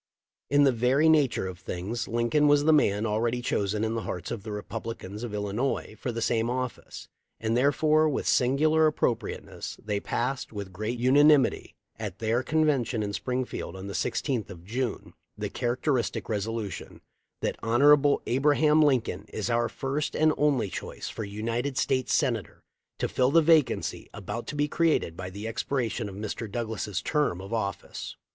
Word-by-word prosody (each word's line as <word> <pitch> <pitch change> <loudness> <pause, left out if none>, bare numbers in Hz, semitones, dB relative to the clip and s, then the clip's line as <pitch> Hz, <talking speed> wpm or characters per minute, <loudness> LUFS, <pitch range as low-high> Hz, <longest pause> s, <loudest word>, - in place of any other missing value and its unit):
In 145 0 +5
the 135 - +5
very 125 +6 +3
nature 150 -10 +3
of 90 -1 -6
things 95 +6 -4
Lincoln 120 +6 +2
was 145 0 +5
the 160 +1 +5
man 105 -7 +3
already 115 +3 0
chosen 105 -3 -1
in 110 0 0
the 115 - -2
hearts 90 -4 -5
of 120 -3 -4
the 110 - -7
Republicans 105 -1 -6
of 120 - -4
Illinois 105 +4 -2
for 125 - -3
the 115 0 -3
same 115 0 +1
office, 125 -1 -5 0.3
and 110 0 0
therefore 155 +4 +3
with 145 - -2
singular 155 +5 +3
appropriate 135 -6 -1
ness - - -7
they 105 -1 -2
passed, 125 +6 -2
with 100 -3 -7
great 110 +6 -3
unanimity, 140 +3 +4 0.2
at 105 -4 -5
their 115 +2 +1
con 155 +4 +1
vention 125 -6 +1
in 100 0 -3
Springfield 125 -6 -3
on 95 +1 -7
the 100 - -6
16th 110 - -1
of 90 -3 -11
June, 120 +2 -3 0.2
the - - -4
characteristic 125 +1 -1
resolution: 110 -1 -4 0.4
"That - - -1
Hon. 140 +5 +5
Abraham 150 +4 +3
Lincoln 130 -6 +1
is 110 +3 -3
our 120 0 +1
first 140 +3 -3
and 155 0 +4
only 140 -9 +1
choice - - -6
for 110 - -5
United 115 +6 -3
States 130 -1 +1
Senator 120 - 0 0.3
to - - -1
fill 130 0 +2
the 165 +3 +5
vacancy 155 -3 +2
about 105 +3 -5
to 150 - -5
be 145 0 +1
created 155 - +1
by 90 +2 -6
the 100 +4 -6
expiration 115 -2 -2
of 95 - -9
Mr. 105 +1 -5
Douglas' 110 -3 -3
term 150 - 0
of 95 +4 -7
office." 100 -5 -4
120 Hz, 170 wpm, -27 LUFS, 105-140 Hz, 0.4 s, In